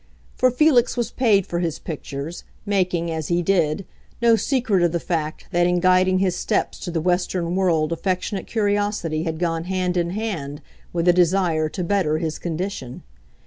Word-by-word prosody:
For 255 - +4
Felix 255 -2 +3
was 240 -1 -1
paid 210 -7 +3
for 170 - -3
his 165 -3 -1
pictures, 150 0 -6 0.2
making, 180 -4 0
as 160 -2 -3
he 175 0 +1
did, 170 -1 +1 0.3
no 235 -1 +5
secret 225 -6 +1
of 175 -1 +2
the 170 - +1
fact 160 -3 -3
that 175 0 +3
in 180 0 +2
guiding 185 +1 +4
his 185 -1 +1
steps - - -1
to - - -5
the 170 -1 -1
Western 180 0 0
world 170 -5 +1
affectionate 185 +3 -2
curiosity 205 -7 0
had 160 -1 -2
gone 165 -1 -1
hand 180 -1 -1
in 170 -1 +1
hand 175 -9 -4 0.3
with 170 0 -1
a 175 - +7
desire 175 -3 +2
to 180 - -4
better 170 -4 +1
his 160 -1 -3
condition. 170 -7 -5
180 Hz, 175 wpm, -22 LUFS, 165-195 Hz, 0.3 s, a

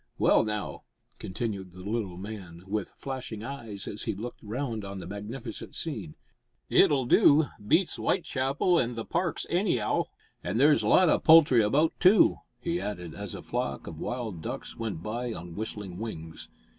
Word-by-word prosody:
Well, - - +4
now," 105 -1 -3 0.4
continued 95 -2 -4
the 90 0 -10
little 100 -4 -2
man, 95 -4 -8
with 100 0 -3
flashing 130 -5 -5
eyes, 115 -6 -6
as 105 - -5
he 110 - -1
looked 115 +5 -7
round 115 0 -3
on 100 0 -6
the 95 - -7
magnificent 105 +5 -7
scene, 115 - -4 0.6
"it'll 135 -3 +5
do. 145 +5 +6 0.2
Beats 180 - +3
W'itechapel 155 0 +1
an' 120 -1 -2
the 115 - -4
Parks 170 -1 -1
any 180 - +2
'ow. 105 - 0 0.4
An' 90 +5 -2
there's 145 +3 +5
lots 185 -3 +5
o' - - +3
poultry 155 -7 +7
about, 145 +10 +3
too!" 190 +4 +6 0.2
he 170 +1 -2
added, 90 -5 -5
as 100 -3 -6
a - - -8
flock 70 0 -3
of - - -8
wild 115 -9 -4
ducks - - -6
went 110 -8 -4
by 120 +2 -3
on 85 -3 -8
whistling 100 -2 -6
wings. 80 -8 -7
110 Hz, 165 wpm, -28 LUFS, 100-135 Hz, 0.6 s, poultry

